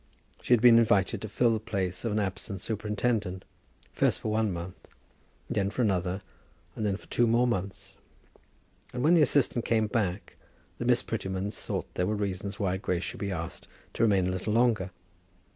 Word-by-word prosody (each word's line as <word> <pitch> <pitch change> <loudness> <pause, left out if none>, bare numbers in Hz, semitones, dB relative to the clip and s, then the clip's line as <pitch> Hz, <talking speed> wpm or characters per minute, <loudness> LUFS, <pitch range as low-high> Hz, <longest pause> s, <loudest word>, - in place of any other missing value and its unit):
She - - +2
had 115 - -2
been 120 -1 +8
invited 105 -2 +2
to 110 - -5
fill 120 +2 +2
the 110 - 0
place 95 -4 -3
of 115 - -1
an 105 - 0
absent 100 0 -3
superintendent, 105 -2 -2 0.5
first - - +2
for 110 - -3
one 110 -1 +1
month, 85 +1 -7 0.6
then 100 -1 0
for 125 - -1
another, 95 -1 0 0.5
and - - -4
then 100 -2 0
for - - -17
two 120 - +2
more 120 +2 +3
months; 100 -5 -3 1.0
and 125 - -1
when 160 +4 +5
the 170 - +6
assistant 130 -4 +2
came 110 -2 +2
back, 105 -3 -2 0.4
the - - -3
Miss - - +3
Prettymans 95 +2 -3
thought - - -3
there 90 - 0
were 105 - 0
reasons 100 +1 -3
why 95 -3 0
Grace 90 -2 -2
should - - -5
be 100 -1 -2
asked 85 -2 -5 0.3
to - - -3
remain 100 -5 +4
a 90 - 0
little 95 +4 -2
longer. 115 -5 +2
105 Hz, 185 wpm, -28 LUFS, 95-115 Hz, 1.0 s, been